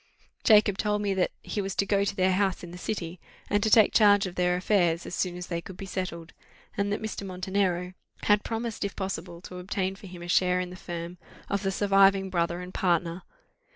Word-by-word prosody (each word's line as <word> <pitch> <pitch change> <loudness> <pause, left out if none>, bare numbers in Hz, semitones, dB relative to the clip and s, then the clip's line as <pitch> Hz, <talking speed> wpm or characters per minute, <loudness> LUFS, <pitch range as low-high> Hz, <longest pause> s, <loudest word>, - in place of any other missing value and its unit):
Jacob 210 -3 +5
told 210 -1 +1
me 200 -1 +1
that 190 -1 +1
he 205 - -3
was 195 0 -4
to 200 - +1
go 200 0 +2
to 200 0 -2
their 185 0 +3
house 190 -1 0
in 175 - -8
the 175 - -9
city, 180 -4 -4 0.3
and 205 0 +3
to 220 - +2
take 215 0 +6
charge 205 -2 +5
of 185 - -5
their 180 0 +1
affairs, 180 -3 +1
as - - -7
soon 180 -1 -1
as 180 - -6
they 170 -1 -3
could 185 +1 -10
be 195 - -6
settled; 175 -3 -5 0.4
and 200 0 0
that 205 - -2
Mr. 220 -2 -4
Montenero 185 -1 -1 0.3
had 205 0 +3
promised 225 -1 -3
if 200 - -3
possible 180 -3 -5
to 180 -1 -9
obtain 190 +1 -2
for 195 - -12
him 180 -1 -10
a - - -7
share 180 0 +3
in 180 0 -3
the - - -8
firm 175 -1 -7 0.3
of 200 -1 0
the 195 -1 0
surviving 195 -1 +4
brother 170 0 0
and 180 +1 -9
partner. 170 -1 0
190 Hz, 225 wpm, -27 LUFS, 180-200 Hz, 0.4 s, take